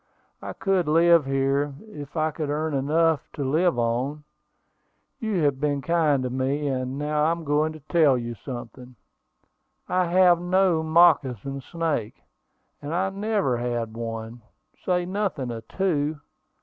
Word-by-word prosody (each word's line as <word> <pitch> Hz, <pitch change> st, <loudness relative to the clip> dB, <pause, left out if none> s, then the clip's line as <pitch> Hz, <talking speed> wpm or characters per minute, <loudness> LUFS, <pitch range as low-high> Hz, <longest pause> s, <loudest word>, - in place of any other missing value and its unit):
I -, -, -6 dB
could 190 Hz, -4 st, 0 dB
live 165 Hz, -1 st, +5 dB
here, 135 Hz, +1 st, 0 dB
if 150 Hz, -5 st, -9 dB
I 155 Hz, 0 st, +1 dB
could 150 Hz, -1 st, -4 dB
earn 155 Hz, +1 st, -1 dB
enough 155 Hz, +3 st, +1 dB
to 145 Hz, -, -4 dB
live 160 Hz, +4 st, +1 dB
on. 125 Hz, +6 st, -1 dB, 1.0 s
You 210 Hz, -7 st, -1 dB
have 140 Hz, -2 st, +1 dB
been 145 Hz, -2 st, 0 dB
kind 155 Hz, -4 st, +2 dB
to 125 Hz, -, -3 dB
me; 135 Hz, +3 st, -1 dB
and 130 Hz, 0 st, -3 dB
now 150 Hz, +1 st, 0 dB
I'm 165 Hz, +1 st, 0 dB
going 150 Hz, +1 st, +1 dB
to 155 Hz, -, -12 dB
tell 150 Hz, -3 st, +3 dB
you 120 Hz, -1 st, -4 dB
something: 125 Hz, +1 st, -9 dB, 0.9 s
I 185 Hz, 0 st, +1 dB
have 175 Hz, -1 st, +4 dB
no 180 Hz, -2 st, +2 dB
moccasin 145 Hz, -5 st, +3 dB
snake, 155 Hz, -8 st, -3 dB, 0.6 s
and 150 Hz, +3 st, -4 dB
I 190 Hz, +2 st, 0 dB
never 200 Hz, -, 0 dB
had 120 Hz, -2 st, -3 dB
one, 115 Hz, 0 st, -6 dB, 0.4 s
say 180 Hz, -1 st, 0 dB
nothing 185 Hz, -10 st, -2 dB
of 115 Hz, -1 st, -8 dB
two. 155 Hz, -6 st, -1 dB
150 Hz, 145 wpm, -25 LUFS, 130-170 Hz, 1.0 s, live